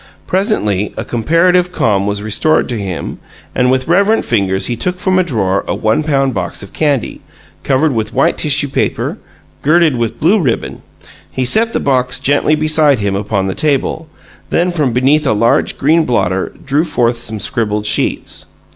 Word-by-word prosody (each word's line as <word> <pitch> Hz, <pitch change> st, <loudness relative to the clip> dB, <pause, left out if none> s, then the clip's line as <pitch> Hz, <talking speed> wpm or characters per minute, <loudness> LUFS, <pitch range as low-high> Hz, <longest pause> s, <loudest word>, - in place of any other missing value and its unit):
Presently 105 Hz, -, -1 dB
a -, -, -4 dB
comparative 175 Hz, +9 st, +2 dB
calm 100 Hz, -, 0 dB
was 100 Hz, 0 st, -2 dB
restored 110 Hz, +9 st, +1 dB
to 120 Hz, -, -2 dB
him, 95 Hz, -4 st, -5 dB, 0.3 s
and 125 Hz, 0 st, +1 dB
with 130 Hz, 0 st, 0 dB
reverent 200 Hz, +6 st, +2 dB
fingers 95 Hz, -4 st, 0 dB
he 120 Hz, -, -2 dB
took 180 Hz, +10 st, -2 dB
from 185 Hz, 0 st, +1 dB
a -, -, +3 dB
drawer 100 Hz, -, -1 dB
a -, -, -1 dB
one 110 Hz, +7 st, +1 dB
pound 135 Hz, -3 st, 0 dB
box 95 Hz, 0 st, -4 dB
of 100 Hz, -, -12 dB
candy, 145 Hz, -6 st, -1 dB, 0.4 s
covered 140 Hz, +2 st, +1 dB
with 110 Hz, -1 st, -2 dB
white 135 Hz, -, +1 dB
tissue 145 Hz, -1 st, 0 dB
paper, 135 Hz, -, -2 dB, 0.4 s
girdled 160 Hz, -1 st, +3 dB
with 115 Hz, -1 st, -3 dB
blue 195 Hz, +7 st, +3 dB
ribbon. 135 Hz, -10 st, -2 dB, 0.5 s
He 130 Hz, -, -2 dB
set 225 Hz, -, +3 dB
the -, -, 0 dB
box 125 Hz, -2 st, 0 dB
gently 145 Hz, +2 st, +2 dB
beside 155 Hz, -2 st, +3 dB
him 100 Hz, -2 st, -1 dB
upon 100 Hz, -1 st, -1 dB
the 95 Hz, -, -2 dB
table; 155 Hz, -, -1 dB, 0.4 s
then 180 Hz, +1 st, +1 dB
from 150 Hz, -7 st, 0 dB
beneath 135 Hz, +5 st, +2 dB
a -, -, +3 dB
large, 115 Hz, +2 st, +1 dB
green 160 Hz, +4 st, +3 dB
blotter 95 Hz, -8 st, -1 dB
drew 145 Hz, +3 st, +1 dB
forth 120 Hz, -7 st, 0 dB
some 110 Hz, -2 st, -6 dB
scribbled 105 Hz, -2 st, -1 dB
sheets. 105 Hz, -, -1 dB
130 Hz, 175 wpm, -14 LUFS, 110-155 Hz, 0.5 s, a